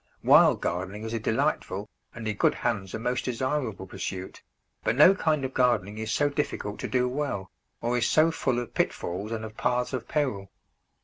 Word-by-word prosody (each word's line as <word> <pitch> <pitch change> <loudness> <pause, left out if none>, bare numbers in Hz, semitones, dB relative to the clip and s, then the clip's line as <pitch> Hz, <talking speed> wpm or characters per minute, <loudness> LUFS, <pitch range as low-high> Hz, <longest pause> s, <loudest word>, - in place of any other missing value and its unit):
Wild - - +6
gardening 95 +5 -3
is 110 0 -4
a 115 - -1
delightful, 110 -4 -1 0.3
and 115 -2 -5
in 105 - -1
good - - +3
hands 100 -6 -2
a - - -1
most 125 +2 -2
desirable, 125 -4 -2
pursuit, 95 0 -6 0.4
but 110 - +1
no 150 +8 +8
kind 155 -7 0
of 130 - -5
gardening 110 -5 +1
is 110 0 -3
so 145 - +2
difficult 140 -8 -3
to - - -3
do 125 -1 +1
well, 125 -9 -3 0.3
or 120 +1 0
is 115 - +1
so 155 +1 +4
full 130 -6 0
of 120 -1 -4
pitfalls 95 +5 -2
and 110 -1 -3
of 110 0 -9
paths 125 +1 0
of 120 -2 -3
peril. 115 -11 -1
115 Hz, 190 wpm, -27 LUFS, 105-130 Hz, 0.4 s, no